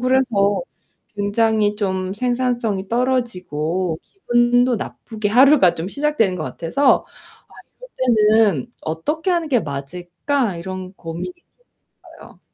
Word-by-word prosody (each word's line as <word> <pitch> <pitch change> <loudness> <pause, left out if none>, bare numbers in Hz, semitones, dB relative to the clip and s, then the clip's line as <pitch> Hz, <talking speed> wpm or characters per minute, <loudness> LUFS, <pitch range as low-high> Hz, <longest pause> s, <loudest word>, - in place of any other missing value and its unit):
그래서 245 - +2 0.5
굉장히 210 0 +1
좀 190 -2 -2
생산성이 240 -4 -1
떨어지고 185 - -1
기분도 245 - +2
나쁘게 215 -1 -5
하루가 255 - +5
좀 165 - -5
시작되는 280 -8 0
것 155 - -4
같아서' 170 +13 +1 0.8
아 - - -10 0.2
이럴 240 -3 +3 0.2
때는 200 - +2
어떻게 300 - -2
하는 340 -3 0
게 250 -5 +3
맞을까.' 175 - -3
이런 185 +1 -6
고민이 170 - -6
좀 355 - -33 0.7
있어요. - - -15
215 Hz, 270 characters per minute, -20 LUFS, 185-255 Hz, 0.8 s, 하루가